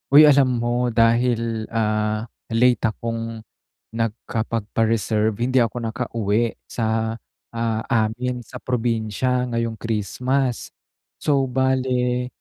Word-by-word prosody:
Uy 150 Hz, +2 st, +9 dB
alam 135 Hz, -4 st, +4 dB
mo 120 Hz, +1 st, 0 dB
dahil, 115 Hz, -1 st, +2 dB
ah, 110 Hz, 0 st, 0 dB, 0.2 s
late 120 Hz, +2 st, +3 dB
akong 115 Hz, 0 st, -2 dB, 0.6 s
nag-kapagpa-reserve 110 Hz, -1 st, -1 dB
hindi 125 Hz, +1 st, +3 dB
ako 115 Hz, +1 st, -3 dB
nakauwi 115 Hz, -1 st, 0 dB, 0.2 s
sa, 110 Hz, -1 st, -1 dB, 0.4 s
ah, 115 Hz, -1 st, 0 dB
amin 120 Hz, +2 st, 0 dB
sa 125 Hz, +2 st, -10 dB
probinsya 120 Hz, +1 st, 0 dB
ngayong 115 Hz, -2 st, -2 dB
Christmas. 120 Hz, +5 st, -1 dB, 0.5 s
So 140 Hz, -3 st, +1 dB
bale, 125 Hz, -1 st, +1 dB
115 Hz, 95 wpm, -22 LUFS, 110-125 Hz, 0.6 s, Uy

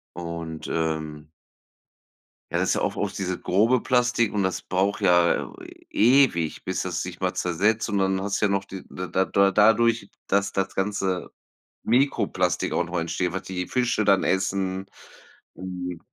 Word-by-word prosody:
Und, 85 Hz, -2 st, -6 dB
ähm 80 Hz, -2 st, -3 dB, 1.2 s
ja, -, -, 0 dB
das -, -, +1 dB
ist -, -, +3 dB
ja -, -, -1 dB
auch -, -, -1 dB
oft -, -, -3 dB
dieses 95 Hz, -1 st, -2 dB
grobe 110 Hz, +7 st, +3 dB
Plastik 120 Hz, -2 st, +1 dB
und 105 Hz, -, 0 dB
das 95 Hz, -1 st, -1 dB
braucht 95 Hz, +3 st, 0 dB
ja 85 Hz, -1 st, +3 dB, 0.4 s
e 130 Hz, +6 st, +6 dB
ewig, 85 Hz, -9 st, -4 dB
bis 95 Hz, 0 st, -2 dB
das 90 Hz, -3 st, -3 dB
sich 90 Hz, -1 st, -7 dB
mal 95 Hz, -1 st, -1 dB
zersetzt, 105 Hz, +6 st, +1 dB
und 100 Hz, -1 st, 0 dB
dann 95 Hz, 0 st, +1 dB
hast 100 Hz, 0 st, -2 dB
du -, -, +4 dB
ja -, -, +1 dB
noch 100 Hz, 0 st, 0 dB
die 95 Hz, -1 st, -9 dB
da 90 Hz, -, -5 dB
da 95 Hz, +1 st, 0 dB
da 100 Hz, 0 st, +3 dB
dadurch, 110 Hz, 0 st, +3 dB, 0.2 s
dass 100 Hz, +1 st, +1 dB
das 95 Hz, -1 st, -2 dB
ganze 95 Hz, -2 st, -1 dB, 0.5 s
Mikroplastik 115 Hz, -, +1 dB
auch 90 Hz, -, 0 dB
noch 85 Hz, +1 st, -3 dB
entsteht, 85 Hz, +1 st, -2 dB
was 95 Hz, -, -3 dB
die 90 Hz, -1 st, -4 dB
Fische 120 Hz, -4 st, 0 dB
dann 100 Hz, -1 st, +4 dB
essen. 95 Hz, 0 st, -1 dB, 0.7 s
Ähm, 90 Hz, -2 st, -6 dB
95 Hz, 170 wpm, -25 LUFS, 90-105 Hz, 1.2 s, e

